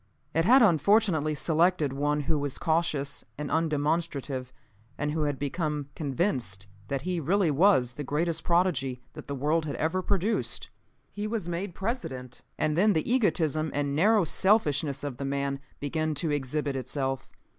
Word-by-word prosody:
It 165 +1 +2
had 255 +4 +7
unfortunately 170 -4 +3
selected 160 -1 +2
one 145 +2 0
who 150 +1 0
was 140 -2 -2
cautious 155 -4 0
and 150 0 -4
undemonstrative, 150 -4 -1 0.5
and 150 0 -1
who 155 0 0
had 145 -2 -1
become 150 0 -2
convinced 130 - -1 0.2
that 135 +2 -2
he 180 0 -1
really 175 +2 +2
was 145 -6 +4
the 145 - -5
greatest 165 +4 -1
prodigy 145 -8 +1
that - - -10
the 140 - -3
world 155 +4 +1
had 145 - -3
ever 165 +4 0
produced. 200 +4 -1 0.4
"He 205 +1 -4
was 215 -5 -3
made 175 +1 -4
President, 135 - -4 0.2
and 150 -1 +1
then 205 +5 +4
the 160 - 0
egotism 160 - +1
and 140 -1 0
narrow 205 +5 +4
selfishness 150 -7 +2
of 140 -4 -4
the 140 - -4
man 140 0 -1 0.2
began 155 +1 -1
to 160 +1 -1
exhibit 145 0 -1
itself. 135 +1 -3
155 Hz, 155 wpm, -28 LUFS, 140-175 Hz, 0.5 s, had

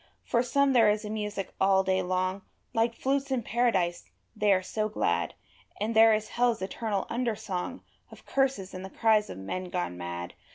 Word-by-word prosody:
For 235 - +2
some 280 +2 +2
there 230 -4 +6
is 210 +1 0
a 210 - -4
music 210 -2 -4
all 190 0 +4
day 190 0 +1
long 185 +1 -1 0.3
Like 230 +1 +1
flutes 275 +2 0
in 260 -3 0
Paradise, 205 -8 0 0.3
they 210 -1 +2
are 185 -1 +3
so 215 +3 -2
glad; 215 - 0 0.4
And 220 +2 -1
there 225 0 +8
is 215 0 -4
hell's 240 -1 +1
eternal 200 0 -2
under 235 -1 -1
song 200 +6 -5 0.3
Of - - -15
curses 265 -9 0
and 185 0 -6
the 190 - -7
cries 215 0 +2
of - - -7
men 140 - -4
gone 90 - -3
mad. 85 0 -5
210 Hz, 190 wpm, -28 LUFS, 185-235 Hz, 0.4 s, there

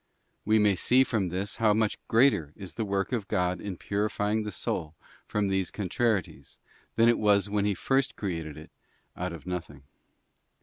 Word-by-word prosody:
We 110 +1 +4
may 105 -2 +4
see 125 +8 +4
from 105 -8 -1
this 95 +3 -3
how 110 -2 +3
much 110 -1 0
greater 115 - +3
is 95 -3 -9
the 110 - -2
work 100 +1 -1
of 115 -6 -2
God 90 0 0
in 100 -4 -5
purifying 105 +2 -1
the 105 -1 -4
soul 80 -3 -3 0.3
from 105 -1 0
these 95 -1 0
contrarieties, 100 - -2 0.4
than 115 0 +5
it 120 - +4
was 100 -1 +3
when 105 -1 +1
He 105 -1 +1
first 135 +7 0
created 80 -7 -4
it 75 - -12 0.4
out 90 0 -3
of 85 0 -9
nothing. 80 -6 -6
100 Hz, 175 wpm, -28 LUFS, 90-110 Hz, 0.4 s, than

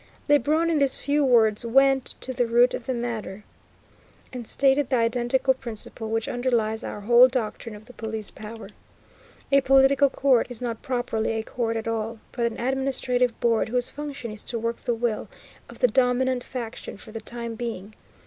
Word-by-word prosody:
Lebrun 300 +4 +3
in 315 - +2
these 275 -2 +3
few 290 +1 +1
words 225 -5 +3
went 270 +2 +3
to 260 - -4
the 245 -1 0
root 240 +2 +4
of 240 - -5
the 260 - 0
matter, 220 -4 -4 0.9
and 245 -3 -6
stated 275 0 +2
the 260 - +2
identical 245 +3 +2
principle 225 -2 -5
which 225 0 -1
underlies 235 -3 0
our 210 - -6
whole 240 +4 +7
doctrine 230 -3 -4
of 210 +1 -13
the 250 - -14
Police 220 -2 -5
Power. 220 +1 -9 0.8
A 275 0 +5
political 270 +1 +5
court 260 -3 +2
is 245 -3 -8
not 235 -2 -4
properly 245 -3 -1
a 220 0 -2
court 230 -1 -2
at 225 - -5
all, 225 0 -2
but 235 -2 0
an 230 - -6
administrative 255 -1 0
board 230 -2 +1
whose 245 +1 0
function 280 -5 -6
is 215 -1 -6
to 235 - -3
work 230 +1 -2
the 240 - -2
will 230 -2 -2 0.4
of - - -12
the - - +4
dominant 255 - +1
faction 235 -5 -7
for 215 - -12
the 225 0 -6
time 235 +1 -6
being. 220 -3 -6
240 Hz, 180 wpm, -25 LUFS, 225-260 Hz, 0.9 s, whole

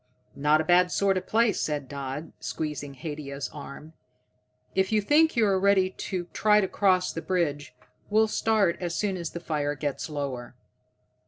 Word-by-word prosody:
"Not 150 +2 +3
a - - -1
bad 180 +2 +4
sort 195 0 +2
of 185 0 -3
place," 225 -2 +2
said 145 -3 -2
Dodd, 140 +3 -6
squeezing 145 -2 -4
Haidia's 140 0 -5
arm. 150 +2 -10 0.8
"If 190 +1 +1
you 215 - +4
think 300 +9 +3
you're 205 -5 +3
ready 190 -1 +3
to 185 -2 -4
try 210 -1 +4
to 195 - +1
cross 185 -1 +2
the 165 - -4
bridge, 150 -8 -2 0.3
we'll 220 +1 +4
start 215 -5 +1
as 175 -1 -2
soon 200 +2 0
as 170 -3 -4
the 170 - -6
fire 150 -3 -2
gets 145 +2 -3
lower." 135 -5 -5
170 Hz, 165 wpm, -27 LUFS, 145-195 Hz, 0.8 s, bad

